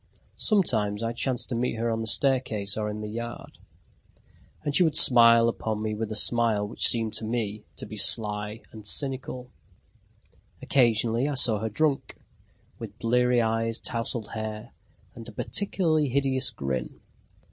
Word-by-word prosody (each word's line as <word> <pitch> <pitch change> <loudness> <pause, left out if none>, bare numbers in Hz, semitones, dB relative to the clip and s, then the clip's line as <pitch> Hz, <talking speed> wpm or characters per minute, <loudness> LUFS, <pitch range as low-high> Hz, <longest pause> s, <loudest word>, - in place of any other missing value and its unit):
Sometimes 110 - +1
I 115 +1 -2
chanced 125 +1 -2
to 125 - -3
meet 120 +1 -1
her 115 +1 -2
on 115 0 -2
the 110 - -4
staircase 115 -6 +1
or 105 -1 -3
in 105 0 -6
the 105 - -5
yard, 115 +2 -8 1.0
and 145 -2 -2
she 185 - +5
would 160 -3 +1
smile 115 -2 +7
upon 110 -2 -3
me 110 0 -2
with 110 0 -4
a - - -3
smile 110 -2 +3
which 110 - +1
seemed 115 -2 +2
to - - -5
me 110 -2 -3
to - - -8
be 110 - -9
sly 105 +1 0
and 110 -2 -11
cynical. 130 -1 -3 1.1
Occasionally, 120 0 +1
I 145 - -3
saw 115 -5 +3
her 110 +1 -3
drunk, 145 +5 -1 0.6
with 110 -3 -9
bleary 125 +1 +2
eyes, 115 0 -1
tousled 115 -2 -4
hair, 110 0 -6 0.4
and 115 0 -11
a - - -9
particularly 160 - -1
hideous 135 0 +1
grin. 65 - -5
115 Hz, 160 wpm, -26 LUFS, 110-125 Hz, 1.1 s, smile